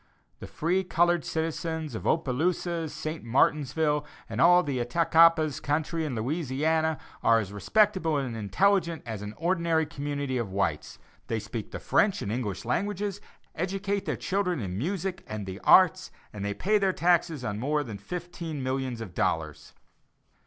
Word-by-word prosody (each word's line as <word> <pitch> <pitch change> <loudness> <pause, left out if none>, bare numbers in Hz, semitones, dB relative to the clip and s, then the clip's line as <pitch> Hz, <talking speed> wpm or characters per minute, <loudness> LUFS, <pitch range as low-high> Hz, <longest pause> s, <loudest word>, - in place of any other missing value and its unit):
The - - -8
free 180 +4 0
colored 175 -2 +2
citizens 160 -2 -3
of 110 - -4
Opelousas, 165 +2 0
St. 155 +2 -5
Martinsville, 150 +4 +2 0.2
and - - -2
all 175 +1 +7
the 140 -5 -2
Attakapas 160 +3 +4
country 155 +2 -1
in 140 -5 -3
Louisiana, 155 +5 0 0.2
are 115 - +5
as 100 -3 -3
respectable 185 - +2
and 130 -4 -3
intelligent 170 - +1
as 110 -4 -5
an 105 +1 -7
ordinary 170 -2 +1
community 145 -3 -3
of 115 -4 -3
whites. 90 -6 -2 0.3
They 115 - -1
speak 105 +1 -6
the - - -6
French 200 -2 +2
and 100 - -3
English 110 -5 -3
languages, 200 - -2 0.3
educate 195 +3 -2
their - - -2
children 185 -4 -1
in 95 -5 -4
music, 185 - -3
and 110 -2 -5
"the 95 0 -6
arts" - - +5 0.2
and 100 -2 -6
they 100 0 -2
pay 210 +2 +2
their 195 -2 +2
taxes 170 -6 +1
on 105 -1 -3
more 145 +4 0
than 110 -6 -7
fifteen 165 - -6
millions 130 -2 -2
of 100 -6 -7
dollars. 75 -3 -2
155 Hz, 155 wpm, -28 LUFS, 120-175 Hz, 0.3 s, all